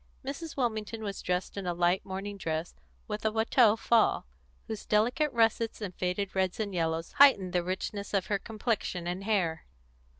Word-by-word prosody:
Mrs. 285 +4 -6
Wilmington 220 -3 -2
was 200 -2 -4
dressed 180 +2 -2
in 195 -2 -4
a 175 - -1
light 175 +3 +2
morning 195 +2 -5
dress 165 -3 -3 0.3
with 210 0 -4
a 220 - +2
Watteau 220 0 +4
fall, 225 0 +2 0.4
whose 220 -2 -6
delicate 245 +8 +2
russets 225 -1 +1
and 200 -4 -5
faded 180 +3 -2
reds 190 0 0
and 205 -3 -2
yellows 165 -1 -1
heightened 270 -11 +5
the 180 - +2
richness 190 +3 -4
of 195 -2 +1
her 200 -1 0
complexion 215 -5 -2
and 180 +2 -3
hair. 185 -7 0
200 Hz, 170 wpm, -30 LUFS, 180-225 Hz, 0.4 s, heightened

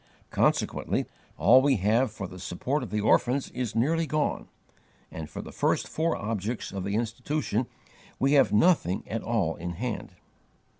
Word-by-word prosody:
Consequently - - +1 0.3
all 130 +2 +6
we 140 0 +3
have 110 +4 +2
for 105 -2 -6
the 90 +1 -11
support 100 +10 -2
of 125 - -5
the 105 0 -1
orphans 125 +5 +2
is 125 -3 -3
nearly 160 +8 +1
gone; 155 0 -1 0.6
and 80 -2 -7
for - - -7
the - - -9
first - - 0
four 165 +1 0
objects 110 +2 -3
of 95 -2 -4
the 100 +2 -2
Institution 120 +1 -1 0.5
we 135 +1 +2
have 140 -2 +5
nothing 105 - +3
at 115 - -3
all 105 -9 0
in 85 +1 -4
hand. 115 +6 -4
115 Hz, 160 wpm, -27 LUFS, 100-135 Hz, 0.6 s, all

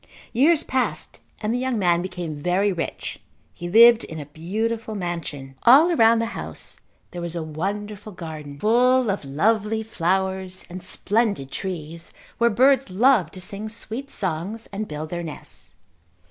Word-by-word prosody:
Years 300 +6 +4
passed 230 -12 -2 0.2
and 215 +2 0
the 245 - 0
young 255 -2 -1
man 175 -3 +2
became 180 -3 -5
very 185 +5 +2
rich. 170 -3 -4 0.3
He 175 - -6
lived 235 +3 +7
in 160 - -7
a 145 - -6
beautiful 220 +9 -3
mansion. 170 -7 -4
All 290 +9 +7
around 230 -7 +5
the 230 - +1
house - - -7 0.3
there 175 - -6
was 170 0 -4
a 170 - -2
wonderful 205 +6 -4
garden 155 -5 -8
full 245 - +4
of 195 - -3
lovely 215 +10 +1
flowers 190 -1 -1
and 185 +1 -6
splendid 200 - 0
trees 165 -3 -6 0.3
where 235 0 +5
birds 260 +3 +4
loved 220 +1 +3
to 185 - -6
sing 200 +4 -6
sweet 230 +4 -4
songs 190 - -3
and 205 +2 -4
build 155 +1 -6
their 175 0 -3
nests. 160 -3 -7
195 Hz, 155 wpm, -23 LUFS, 170-230 Hz, 0.3 s, lived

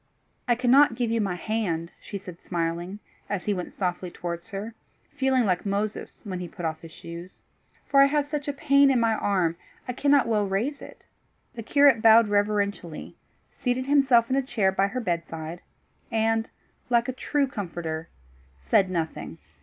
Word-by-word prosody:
"I 240 - +4
cannot 250 +1 +5
give 235 -1 -1
you 230 -1 +1
my 195 -3 -1
hand," 175 -5 -2
she 200 - -6
said 180 -3 -10
smiling, 170 +2 -3 0.3
as 200 -3 -3
he 210 - +1
went 180 -2 -5
softly 180 -1 -3
towards 170 +3 -6
her, 210 +2 -5 0.4
feeling 265 -3 +1
like 180 -3 +1
Moses 205 +1 -3
when 190 -4 -5
he 180 - -5
put 170 0 -7
off 160 -1 -3
his 165 - -11
shoes, 170 +3 -10 0.4
"for 275 -1 +5
I 275 - +7
have 290 0 +1
such 290 -1 -4
a 285 - -1
pain 280 -1 +4
in 260 -2 +3
my 230 -1 +2
arm, 185 -6 0 0.3
I 250 - -2
cannot 280 0 +3
well 210 -3 +1
raise 235 +10 -2
it." - - -13 0.5
The 235 - -6
curate 280 0 +4
bowed 225 -1 +7
reverentially, 205 -5 -1 0.4
seated 255 0 -1
himself 265 -5 +4
in - - +3
a 275 - +3
chair 230 -7 +1
by 195 +1 +2
her 255 +5 -4
bedside, 170 -4 -4 0.5
and, 225 0 +1 0.4
like 240 0 +3
a 260 - -2
true 285 +2 0
comforter, 170 - -5 0.5
said 70 - +2
nothing. 165 -3 -4
210 Hz, 175 wpm, -26 LUFS, 180-250 Hz, 0.5 s, I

